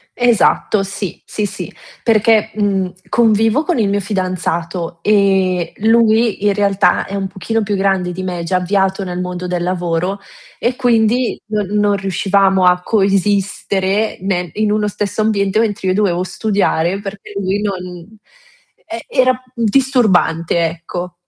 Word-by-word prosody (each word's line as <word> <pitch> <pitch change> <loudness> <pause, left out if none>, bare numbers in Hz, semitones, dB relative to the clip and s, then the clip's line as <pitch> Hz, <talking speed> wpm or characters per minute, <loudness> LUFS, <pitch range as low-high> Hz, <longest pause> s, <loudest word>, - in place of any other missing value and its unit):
Esatto, 235 -3 +2
sì, 195 -1 -6
sì 210 - -3
sì. - - -6 0.3
Perché, 220 -1 +3
mhmm, 195 -3 0 0.2
convivo 225 +3 +3
con 350 0 -1
il 220 -3 +2
mio 200 +1 0
fidanzato, 180 -3 -3
e 190 -4 +2
lui 225 -1 +3
in 205 - +4
realtà, 200 0 +2
è 195 - -9
un 195 -1 -2
pochino 200 +4 -2
più 205 -1 -1
grande 190 -2 0
di 185 +1 -5
me, 180 -2 -3
già 185 +2 0
avviato 190 +1 0
nel 180 -1 -4
mondo 180 0 -5
del 180 -1 -2
lavoro, 180 +1 -1 0.4
e 245 +1 0
quindi 240 -1 +1
non 210 -1 -1
non 205 0 +1
riuscivamo 195 0 +2
a 180 0 +4
coesistere, 200 0 0
ne 180 -2 -1
in 215 0 0
uno 210 0 +1
stesso 205 +1 -2
ambiente, 205 -1 +1
mentre 205 -4 0
io - - +2
dovevo 185 -3 +1
studiare 195 -3 0
perché 200 0 -8
lui 195 +1 -1
non 185 0 -6 0.7
e 230 0 -6
era 255 -1 +2
disturbante, 225 - +2
ecco. 170 +2 -5
200 Hz, 145 wpm, -17 LUFS, 185-215 Hz, 0.7 s, in